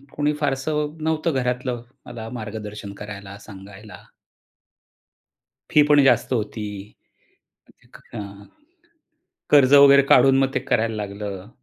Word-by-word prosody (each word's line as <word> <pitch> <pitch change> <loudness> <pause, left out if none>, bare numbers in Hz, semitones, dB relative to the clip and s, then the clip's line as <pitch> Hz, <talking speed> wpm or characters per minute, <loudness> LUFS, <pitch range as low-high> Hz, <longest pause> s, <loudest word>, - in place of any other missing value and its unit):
कोणी 150 0 0
फारसं 150 +2 -2
नव्हतं 160 0 -1
घरातलं 125 -1 -2 0.2
मला 115 -2 -8
मार्गदर्शन 105 -2 -8
करायला, 100 -1 -10
सांगायला. 100 +1 -13 1.7
फी 150 - +5
पण 145 -1 +5
जास्त 135 - +2
होती. 110 -2 -3 1.5
अ, - - -5 1.3
कर्ज 140 -1 +5
वगैरे 140 0 +7
काढून 135 0 +5
मग 135 0 +1
ते - - 0
करायला 115 -1 -1
लागलं. 100 -1 -6
120 Hz, 105 wpm, -22 LUFS, 105-140 Hz, 1.7 s, वगैरे